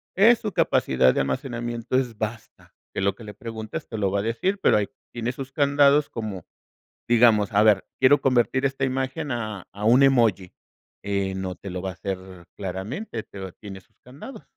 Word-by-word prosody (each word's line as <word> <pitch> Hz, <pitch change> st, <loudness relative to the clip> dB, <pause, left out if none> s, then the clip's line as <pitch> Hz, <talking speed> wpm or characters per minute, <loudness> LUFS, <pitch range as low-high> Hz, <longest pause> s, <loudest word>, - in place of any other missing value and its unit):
es 225 Hz, +4 st, +6 dB
su 210 Hz, -, -4 dB
capacidad 65 Hz, -, +3 dB
de -, -, -1 dB
almacenamiento 120 Hz, -, -3 dB
es 120 Hz, -4 st, -2 dB
basta, 110 Hz, +1 st, -7 dB, 0.2 s
que -, -, -2 dB
lo 100 Hz, 0 st, +2 dB
que 115 Hz, -, -13 dB
le 105 Hz, -1 st, -9 dB
preguntes 110 Hz, -1 st, -7 dB
te 110 Hz, -, -6 dB
lo 100 Hz, -2 st, +1 dB
va 100 Hz, -, 0 dB
a -, -, 0 dB
decir, 185 Hz, -, -1 dB
pero -, -, +4 dB
ahí 105 Hz, -1 st, -1 dB, 0.2 s
tiene 120 Hz, +1 st, -2 dB
sus 130 Hz, +1 st, -8 dB
candados 140 Hz, +1 st, +3 dB
como, 105 Hz, -6 st, -6 dB, 0.6 s
digamos, 115 Hz, -4 st, +4 dB
a 105 Hz, +1 st, +4 dB
ver, 105 Hz, -3 st, +4 dB
quiero 145 Hz, +2 st, +5 dB
convertir 130 Hz, +1 st, +2 dB
esta 135 Hz, 0 st, -1 dB
imagen 135 Hz, +2 st, -2 dB
a 110 Hz, -5 st, -4 dB
a 100 Hz, +1 st, -7 dB
un 125 Hz, +5 st, +6 dB
emoji. 115 Hz, -9 st, +3 dB, 0.5 s
Eh, 100 Hz, -1 st, -1 dB
no 95 Hz, -1 st, -4 dB
te 100 Hz, 0 st, -9 dB
lo 90 Hz, 0 st, -4 dB
va 95 Hz, -, -3 dB
a -, -, -7 dB
hacer 95 Hz, -1 st, -4 dB, 0.4 s
claramente, 105 Hz, -, -5 dB
pero 95 Hz, -2 st, -9 dB
tiene 95 Hz, -1 st, -10 dB
sus -, -, -33 dB
candados. 140 Hz, -, -11 dB
115 Hz, 190 wpm, -24 LUFS, 100-130 Hz, 0.6 s, es